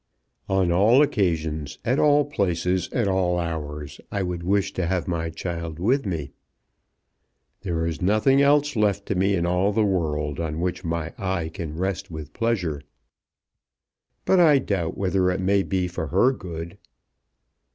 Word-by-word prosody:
"On 95 Hz, -2 st, +2 dB
all 110 Hz, +10 st, +5 dB
occasions, 80 Hz, -, -1 dB
at 130 Hz, +4 st, +1 dB
all 145 Hz, -1 st, +4 dB
places, 90 Hz, -, -1 dB
at 115 Hz, -5 st, 0 dB
all 95 Hz, -2 st, +1 dB
hours, 75 Hz, -4 st, -5 dB
I 100 Hz, -, -1 dB
would 90 Hz, -1 st, -3 dB
wish 100 Hz, +2 st, 0 dB
to 90 Hz, -2 st, -1 dB
have 90 Hz, -1 st, -1 dB
my 85 Hz, -2 st, -2 dB
child 85 Hz, -1 st, -5 dB
with 125 Hz, +8 st, +1 dB
me. 80 Hz, -7 st, -3 dB, 1.3 s
There 85 Hz, -4 st, -2 dB
is 80 Hz, -2 st, -3 dB
nothing 110 Hz, +9 st, +3 dB
else 145 Hz, 0 st, +3 dB
left 100 Hz, -2 st, +1 dB
to -, -, -1 dB
me 95 Hz, +1 st, +2 dB
in 85 Hz, -2 st, 0 dB
all 90 Hz, +3 st, +2 dB
the 110 Hz, +1 st, +2 dB
world 75 Hz, -6 st, -1 dB
on 80 Hz, -1 st, -3 dB
which 90 Hz, +1 st, -2 dB
my 85 Hz, -1 st, -3 dB
eye 95 Hz, -4 st, -2 dB
can 80 Hz, -3 st, -6 dB
rest 95 Hz, -1 st, -2 dB
with 80 Hz, -2 st, -8 dB
pleasure. 95 Hz, -11 st, -1 dB, 1.4 s
But 190 Hz, -, +4 dB
I 155 Hz, -5 st, +6 dB
doubt 95 Hz, -10 st, -2 dB
whether 95 Hz, -1 st, +1 dB
it 90 Hz, +1 st, -1 dB
may 100 Hz, +1 st, +2 dB
be 95 Hz, -1 st, -1 dB
for 85 Hz, -2 st, -4 dB
her 125 Hz, -, +3 dB
good." 85 Hz, -3 st, -7 dB
90 Hz, 160 wpm, -24 LUFS, 80-100 Hz, 1.4 s, I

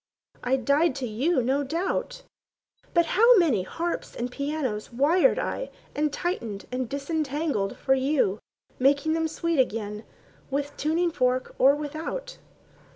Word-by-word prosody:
I 250 Hz, +2 st, +2 dB
died 280 Hz, +4 st, +2 dB
to 270 Hz, -, -3 dB
you, 255 Hz, +6 st, +1 dB
no 270 Hz, +4 st, +1 dB
doubt. 340 Hz, -, -2 dB, 0.7 s
But 340 Hz, -1 st, +3 dB
how 460 Hz, +7 st, +6 dB
many 300 Hz, -, +3 dB
harps 335 Hz, -, -4 dB
and 245 Hz, +1 st, -3 dB
pianos 280 Hz, -6 st, -3 dB
Wired 315 Hz, -, +3 dB
I -, -, -2 dB, 0.2 s
and 300 Hz, 0 st, 0 dB
tightened 235 Hz, -, -3 dB
and 250 Hz, -2 st, -2 dB
disentangled 285 Hz, -6 st, -2 dB
for 265 Hz, -, +2 dB
you, 265 Hz, -7 st, +1 dB, 0.4 s
Making 280 Hz, +4 st, +3 dB
them 325 Hz, 0 st, +1 dB
sweet 330 Hz, 0 st, -1 dB
again—with 245 Hz, +5 st, -3 dB
tuning 335 Hz, +3 st, +1 dB
fork 255 Hz, -3 st, 0 dB
or 275 Hz, +2 st, +6 dB
without? 310 Hz, -, -5 dB
285 Hz, 130 wpm, -26 LUFS, 255-325 Hz, 0.7 s, how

